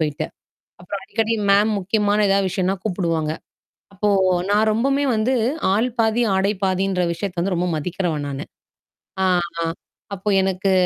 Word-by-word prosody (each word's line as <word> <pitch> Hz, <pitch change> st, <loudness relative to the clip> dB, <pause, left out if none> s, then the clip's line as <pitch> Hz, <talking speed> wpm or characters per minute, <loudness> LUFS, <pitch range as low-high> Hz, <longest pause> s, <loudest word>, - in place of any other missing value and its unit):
போயிட்டு. 155 Hz, 0 st, -1 dB, 0.5 s
அப்புறம் 190 Hz, +2 st, -6 dB
அடிக்கடி 225 Hz, 0 st, 0 dB, 0.2 s
மேம் 205 Hz, +2 st, +4 dB
முக்கியமான 205 Hz, +2 st, +1 dB
எதாவது 195 Hz, -1 st, +2 dB
விஷயம்ன்னா 190 Hz, +1 st, 0 dB
கூப்பிடுவாங்க. 165 Hz, -4 st, -1 dB, 0.6 s
அப்போ 205 Hz, +2 st, -1 dB, 0.4 s
நா 205 Hz, -, +3 dB, 0.2 s
ரொம்பவுமே 275 Hz, +5 st, +1 dB
வந்து, 220 Hz, +4 st, +1 dB, 0.4 s
ஆள் 230 Hz, +5 st, +2 dB
பாதி 225 Hz, +1 st, +2 dB
ஆடை 195 Hz, +2 st, +2 dB
பாதின்ற 190 Hz, 0 st, 0 dB
விஷயத்தை 180 Hz, +1 st, -5 dB
வந்து 185 Hz, +1 st, 0 dB
ரொம்ப 180 Hz, +1 st, 0 dB
மதிக்கிறவ 175 Hz, +1 st, -2 dB
நானு. 140 Hz, +3 st, -5 dB, 0.8 s
ஆ, -, -, +3 dB, 0.4 s
ஆ -, -, +1 dB, 0.5 s
அப்போ 195 Hz, +2 st, -3 dB
எனக்கு 190 Hz, +1 st, 0 dB
195 Hz, 140 wpm, -21 LUFS, 180-210 Hz, 0.8 s, மேம்